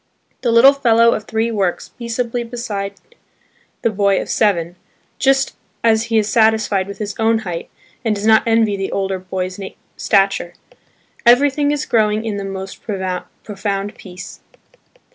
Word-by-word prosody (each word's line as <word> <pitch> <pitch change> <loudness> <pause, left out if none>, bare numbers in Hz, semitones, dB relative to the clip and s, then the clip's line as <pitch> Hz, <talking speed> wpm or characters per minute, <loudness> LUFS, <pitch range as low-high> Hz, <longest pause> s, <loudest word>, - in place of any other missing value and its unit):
The 240 - +1
little 245 +4 +7
fellow 235 -4 +4
of 215 - -4
three 225 +1 -1
works 195 -5 -1
peaceably 235 0 -3
beside 215 -5 -5 0.9
the 230 - +2
boy 200 -1 +2
of - - -6
seven, 175 -5 +1 0.4
just 270 0 +2 0.3
as 225 -1 +3
he 225 -1 0
is 210 -2 +2
satisfied 220 -3 +2
with 200 - -8
his 210 -1 -4
own 225 0 +3
height 170 -2 -5 0.3
and 220 -3 +1
does 205 +1 -4
not 220 0 +6
envy 225 -2 +3
the 195 -1 -3
older 195 -1 -1
boy's 185 0 -4 0.4
stature. 195 -3 +1 0.7
Everything 280 +4 +4
is 295 0 -1
growing 215 -1 +1
in 215 -2 -2
the 200 - -4
most 195 0 -7
profound 195 +1 -4
peace. 180 -1 -11
215 Hz, 145 wpm, -18 LUFS, 195-230 Hz, 0.9 s, little